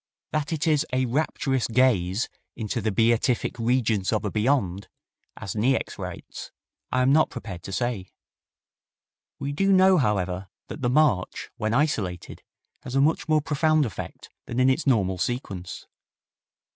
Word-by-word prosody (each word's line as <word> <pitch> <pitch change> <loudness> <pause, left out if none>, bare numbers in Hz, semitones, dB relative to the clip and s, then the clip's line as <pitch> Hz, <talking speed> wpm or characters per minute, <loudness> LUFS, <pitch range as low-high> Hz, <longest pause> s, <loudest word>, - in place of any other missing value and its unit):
That 155 0 -1
it 160 0 -1
is 155 -2 +3
"a 130 0 +1
rapturous 135 -1 0
gaze 110 -4 +2 0.3
into 115 +1 -3
the 110 +1 0
beatific 115 +3 +1
regions 115 -4 +1
of 110 - 0
a - - -1
beyond," 105 -5 0 0.5
as 100 - -6
Niecks 125 +5 0
writes, - - -7 0.4
I 130 0 +2
am 135 +2 +4
not 155 +1 +4
prepared 90 -5 -7
to 95 - -8
say. 110 -3 -2 1.3
We 140 - -3
do 195 +7 +1
know, 190 -1 +6
however, 95 -5 -1 0.2
that 150 - -7
the 120 - +1
march, 130 -9 +1
when 110 +2 -1
isolated, 105 - -1 0.4
has 130 0 -6
a - - +4
much 155 +3 +2
more 155 -1 +4
profound 155 0 +2
effect 105 -9 -7 0.2
than 120 - -3
in 130 +1 +5
its 140 +3 -1
normal 95 -8 +2
sequence. 95 -5 -4
125 Hz, 150 wpm, -25 LUFS, 105-145 Hz, 1.3 s, know